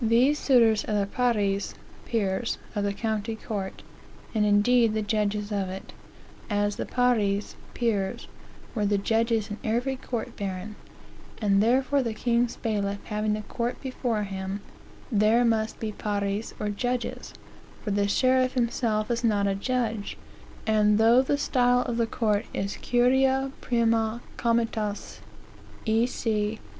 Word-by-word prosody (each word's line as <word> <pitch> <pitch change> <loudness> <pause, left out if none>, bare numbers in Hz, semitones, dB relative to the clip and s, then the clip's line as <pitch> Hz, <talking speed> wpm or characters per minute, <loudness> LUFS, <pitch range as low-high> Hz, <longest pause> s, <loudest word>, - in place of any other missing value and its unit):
These 245 +6 +4
suitors 230 -5 +4
are 215 - -1
the 200 - +1
pares 205 -3 0 0.3
(peers) 220 0 -1 0.2
of 205 -2 -1
the 200 - +1
county 220 +1 -2
court, 200 -3 -5 0.5
and 215 -2 +2
indeed 215 +2 +4
the 215 - 0
judges 210 -1 -1
of 195 -2 -1
it; 190 +1 -8 0.6
as 205 -1 0
the - - -3
pares 215 -5 +1 0.2
(peers) 210 -5 -1 0.5
were 210 -3 0
the 205 0 +2
judges 225 +1 +1
in 210 - -5
every 240 +4 0
court 240 -3 -5
baron; 200 +1 -5 0.6
and 200 -2 +3
therefore 260 +5 +3
the 230 -3 -3
king's 235 +1 +1
bailiff 205 -3 -1
having 210 0 -1
a 215 - -6
court 235 +3 -3
before 245 -5 -2
him, 195 0 -4 0.5
there 220 +3 +4
must 225 -1 0
be 220 -1 -3
pares 205 0 -2
or 210 - -1
judges, 245 +4 -3 0.5
for 210 - -2
the 200 0 +2
sheriff 255 +4 +3
himself 230 -2 0
is 235 0 -1
not 210 -3 +2
a 200 - +2
judge; 225 0 -2 0.5
and 210 -1 +3
though 230 +3 +6
the 275 +2 0
style 245 -3 +2
of 240 -2 -3
the 230 -1 +1
court 210 -3 0
is 195 +1 -2
Curia 265 +2 +2
prima 230 -1 +1
Comitatus 230 -3 -1 0.7
E. 225 +2 +3
C. 215 -3 -1
220 Hz, 145 wpm, -27 LUFS, 205-240 Hz, 0.7 s, though